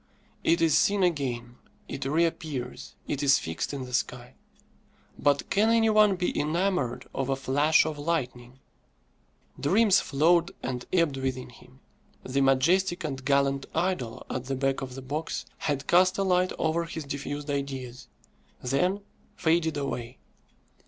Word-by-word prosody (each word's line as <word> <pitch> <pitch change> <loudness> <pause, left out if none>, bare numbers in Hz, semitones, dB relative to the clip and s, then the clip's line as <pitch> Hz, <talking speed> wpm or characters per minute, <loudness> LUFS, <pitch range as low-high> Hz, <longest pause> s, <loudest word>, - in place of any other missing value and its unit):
It 165 0 +3
is 160 -2 +4
seen 200 -1 +3
again, 125 -8 -1 0.3
it 135 - -5
reappears, 150 -4 -2
it 145 - -2
is 140 -1 +5
fixed 80 0 -4
in 135 -2 -5
the 125 - -10
sky. 125 0 -2 0.9
But 140 -1 +1
can 210 +3 +3
any 225 -1 +4
one 210 -2 +5
be 180 -1 -1
enamoured 150 -6 -1
of 135 0 -2
a 135 - +2
flash 145 +4 +3
of 155 -2 -4
lightning? 130 -6 -3 1.0
Dreams 195 +6 +4
flowed 165 +5 +2
and 125 -2 -4
ebbed 170 -7 +2
within 130 -1 -3
him. 130 +2 -18 0.4
The 135 +2 -1
majestic 175 +8 +2
and 135 -4 -4
gallant 140 0 +1
idol 175 -11 -2
at 130 0 -4
the 135 +1 -2
back 135 0 0
of 130 -1 -6
the 135 - -8
box 150 +5 -4
had 145 -1 -2
cast 185 +1 +4
a 195 - +1
light 185 -1 +2
over 165 +1 0
his 165 -1 -6
diffused 145 +1 -5
ideas, 130 -3 -4 0.5
then 180 +10 0 0.3
faded 160 -2 +1
away. 125 -3 -4
145 Hz, 145 wpm, -27 LUFS, 130-170 Hz, 1.0 s, is